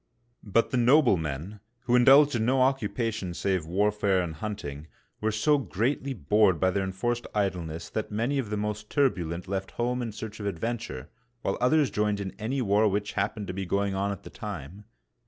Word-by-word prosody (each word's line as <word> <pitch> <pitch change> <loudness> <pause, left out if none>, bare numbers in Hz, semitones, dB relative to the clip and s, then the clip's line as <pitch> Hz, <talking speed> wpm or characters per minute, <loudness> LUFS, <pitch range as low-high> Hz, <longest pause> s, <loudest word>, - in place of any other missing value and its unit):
But 115 +2 +1
the 130 - +1
noblemen, 105 - +2 0.2
who 120 0 +1
indulged 140 +4 +7
in 110 - +1
no 130 +2 +3
occupation 115 -8 -1
save 95 -5 -1
warfare 100 +1 +2
and 85 -2 -4
hunting, 80 -5 -6 0.3
were 110 +1 0
so 145 +8 +3
greatly 130 +5 -1
bored 95 - +3
by 95 0 +3
their 100 +1 0
en 95 0 -2
f6rced 120 +5 -2
idleness 85 -5 -2
that 110 - -3
many 120 +7 0
of 120 -6 -3
the 105 - -2
most 105 +1 -3
turbulent 90 - 0
left 95 0 -3
home 125 +1 0
in 115 -2 -3
search 110 +1 -7
of 100 - -3
adventure, 100 - -4 0.3
while 100 - 0
others 140 0 +3
joined 105 0 0
in 95 -1 -4
any 125 +5 -1
war 105 +1 +3
which 105 +1 -1
happened 105 -2 -2
to 90 - -5
be 95 0 -4
going 100 +1 0
on 100 +1 0
at 100 - -7
the - - -10
time. 100 - -7
105 Hz, 190 wpm, -27 LUFS, 95-120 Hz, 0.3 s, indulged